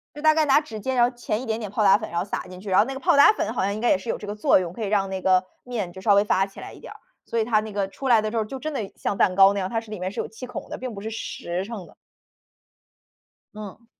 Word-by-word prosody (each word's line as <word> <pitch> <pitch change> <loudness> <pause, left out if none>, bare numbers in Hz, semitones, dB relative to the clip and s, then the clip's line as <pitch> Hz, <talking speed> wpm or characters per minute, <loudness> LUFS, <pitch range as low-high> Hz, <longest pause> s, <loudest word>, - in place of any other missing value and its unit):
就 295 - -8
大 310 0 +5
概 315 - +3
拿 290 +1 +5
指 225 -8 -8
尖， 260 +5 -2
然 240 - +4
后 250 - -16
钳 225 -2 -2
一 - - -6
点 220 -2 -1
点 210 -3 -6
泡 215 - 0
打 195 0 +6
粉， 215 - -7
然 170 - -1
后 175 - -2
撒 200 - -4
进 180 0 -11
去， 205 - -7
然 185 - +4
后 215 - +5
那 270 - -5
个 265 - -6
泡 275 - +3
打 285 - +8
粉 220 - -2
好 235 - -1
像 200 +1 0
应 215 - -5
该 240 - +2
也 - - +4
是 210 +4 -9
有 - - -1
这 210 - -9
个 205 - -4
作 210 - +4
用， 175 -2 -4
可 220 - -6
以 205 - -1
让 195 -1 +1
那 190 -1 -4
个 185 0 +3 0.2
面 225 -8 -4
就 190 +2 -11
稍 205 +1 +4
微 200 +1 +5
发 195 -2 +2
起 195 - -13
来 - - -8
一 - - -13
点 - - -10
儿。 - - -15 0.3
所 230 - -2
以 - - +2
它 215 -2 +2
那 215 0 -7
个 200 -1 -1
出 265 +7 -6
来 225 -3 +6
的 215 - -2
时 230 - -3
候 220 - 0
就 265 +5 -7
真 310 +1 -4
的 210 -7 -4
像 200 - -3
蛋 185 - +3
糕 195 +1 +6
那 200 - -2
样， 185 - -2
它 225 - -1
是 225 - -15
里 210 -3 -6
面 185 +1 -3
是 - - -6
有 - - -2
气 225 +3 -9
孔 250 - -8
的， - - -5
并 255 -2 -6
不 200 - -8
是 220 - -4
实 185 -4 -4
成 205 -5 -7
的。 - - -19 1.6
嗯。 215 +1 -10
215 Hz, 375 characters per minute, -24 LUFS, 195-235 Hz, 1.6 s, 打